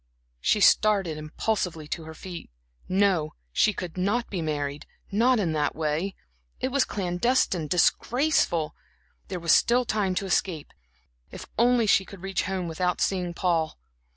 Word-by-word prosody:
She 210 - +2
started 200 -6 +4
impulsively 165 0 -2
to 165 0 -4
her 160 0 -9
feet. 175 +1 -8 0.4
No, 185 -5 +2 0.2
she 215 - +4
could 180 -3 -7
not 205 +6 0
be 185 -4 -2
married 145 -2 -3 0.2
not 235 +4 +3
in 180 -6 0
that 150 -1 0
way; 160 +5 -1 0.4
it 260 - -1
was 280 0 +2
clandestine, 180 -2 0
disgraceful. 180 - +2 0.5
There 185 -2 -4
was 165 -1 +1
still 245 +1 +4
time 210 -5 0
to 195 - -1
escape. 180 -4 -1 0.6
If - - -9
only 240 0 +3
she 200 -2 +4
could 190 -1 -12
reach 195 -4 -1
home, 185 -1 -2
without 180 +2 -1
seeing 180 -3 -1
Paul! 165 - 0
185 Hz, 150 wpm, -26 LUFS, 160-210 Hz, 0.6 s, started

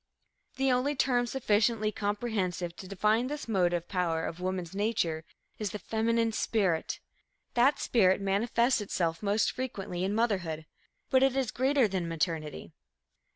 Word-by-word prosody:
The 270 0 +2
only 260 +4 +1
term 245 -2 +2
sufficiently 220 -3 +1
comprehensive 205 -5 -2
to 190 - -9
define 215 +5 +1
this 295 -1 -5
motive 175 -5 +1
power 170 -3 0
of 165 - -5
woman's 185 -2 -3
nature 195 -6 -1 0.3
is 210 -2 -1
the 210 - -5
feminine 225 +3 0
spirit. 195 -7 0 0.5
That 265 +4 +4
spirit 190 -6 +3
manifests 230 +5 +2
itself 170 -5 -1
most 210 +1 +2
frequently 200 -8 -4
in 195 +2 0
motherhood, 185 -9 0 0.5
but 260 - +5
it 270 -1 +3
is 265 -4 0
greater 265 -1 +3
than 185 -3 -2
maternity. 155 - -3
205 Hz, 140 wpm, -30 LUFS, 180-235 Hz, 0.5 s, but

